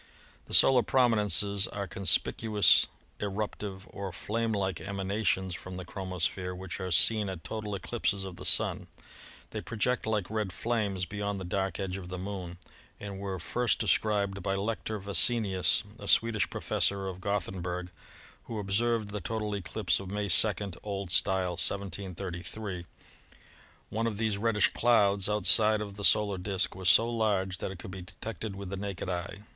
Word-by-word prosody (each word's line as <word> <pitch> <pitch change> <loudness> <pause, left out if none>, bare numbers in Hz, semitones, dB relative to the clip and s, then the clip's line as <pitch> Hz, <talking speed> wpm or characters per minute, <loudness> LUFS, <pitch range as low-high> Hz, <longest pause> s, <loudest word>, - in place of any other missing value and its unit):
The - - +3
solar 130 -2 +7
prominences 105 -5 +3
are 100 -1 -4
conspicuous 100 +3 +3 0.3
eruptive 100 -1 -4
or 100 -1 -5
flame 115 +6 -2
like 95 -4 -1
emanations 95 0 -1
from 90 +1 -7
the 90 -1 -6
chromosphere 90 0 -3
which 95 0 -6
are 95 -1 -3
seen 105 +4 +3
at 90 -3 -6
total 105 -2 -4
eclipses 100 0 -1
of 95 -2 -7
the - - -9
Sun. - - +2 0.6
They - - -4
project 115 +2 -1
like 105 -4 0
red 105 -3 -1
flames 100 -2 -1
beyond 100 +2 -3
the - - -5
dark 95 +2 -2
edge 95 -1 -3
of 90 -2 -8
the 90 - -5
Moon, 90 -2 -6 0.4
and 100 -2 -7
were 95 -1 -4
first 120 +8 0
de - - -2
scribed 100 -2 +1
by 95 +1 -1
Lector 110 +2 -2
Vassenius, 100 -1 +3 0.2
a - - -8
Swedish 115 -3 +3
professor 100 -1 +1
of 95 -1 -6
Gothenburg, 90 -3 -3 0.5
who 115 - -5
observed 105 +2 0
the 105 0 -4
total 105 +2 -3
eclipse 100 +1 0
of 95 -1 -7
May 105 0 -2
2 90 +5 +7 0.4
(O.S.), 100 -3 +2
1733. 95 0 -3 1.0
One 115 +2 -1
of 110 -3 -3
these 110 -2 0
reddish 110 -1 +3
clouds 100 -5 +3
outside 105 +1 +5
of 100 -2 -6
the 100 - -7
solar 100 -1 +4
disk 95 0 -1
was 95 -1 +1
so 115 +4 +6
large 100 -5 0
that - - -3
it 95 - -7
could 90 - -8
be 95 0 -7
detected 105 +3 -6
with 100 -1 -7
the 100 - -4
naked 100 -1 -5
eye. 90 +2 -4
100 Hz, 160 wpm, -30 LUFS, 95-105 Hz, 1.0 s, solar